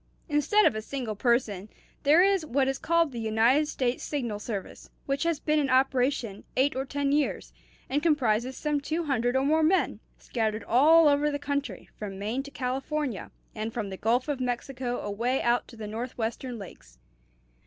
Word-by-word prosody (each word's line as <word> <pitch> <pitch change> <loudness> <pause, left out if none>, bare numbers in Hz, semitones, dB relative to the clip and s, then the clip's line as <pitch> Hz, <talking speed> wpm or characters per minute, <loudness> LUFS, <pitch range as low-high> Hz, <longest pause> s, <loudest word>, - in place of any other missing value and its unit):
"Instead 320 +8 +3
of - - +4
a 215 - -4
single 240 -2 -4
person, 215 -4 0 0.3
there 305 +5 +6
is 390 -3 +3
what 275 -2 +1
is 270 0 -1
called 335 -2 +2
the 240 - -6
United 230 +7 +3
States 255 -4 -1
Signal 240 -8 -3
Service, 210 -3 -6 0.2
which 275 0 -1
has 335 -3 0
been 305 0 +1
in 280 -3 0
operation 255 -5 +1
eight 270 +2 +3
or 265 +1 -2
ten 280 +1 -1
years, 290 0 0 0.3
and 290 +3 0
comprises 260 -6 +1
some 295 -2 -1
two 320 +4 -2
hundred 245 -4 0
or 265 +1 +2
more 315 +2 +3
men, 340 +5 +2 0.2
scattered 220 -2 -2
all 310 +7 +6
over 290 +1 +3
the 285 - -2
country, 285 0 -3
from 200 -2 -6
Maine 215 +7 -2
to 280 - -10
California, 265 -2 -3 0.2
and 220 +1 -4
from 210 -5 -3
the - - -4
Gulf 240 +6 +1
of 290 -3 -2
Mexico 250 0 -3
away 235 +6 -1
out 240 +1 +1
to 235 - -13
the 220 -1 -7
Northwestern 235 +2 -4
lakes. 115 - -12
260 Hz, 180 wpm, -27 LUFS, 230-290 Hz, 0.3 s, there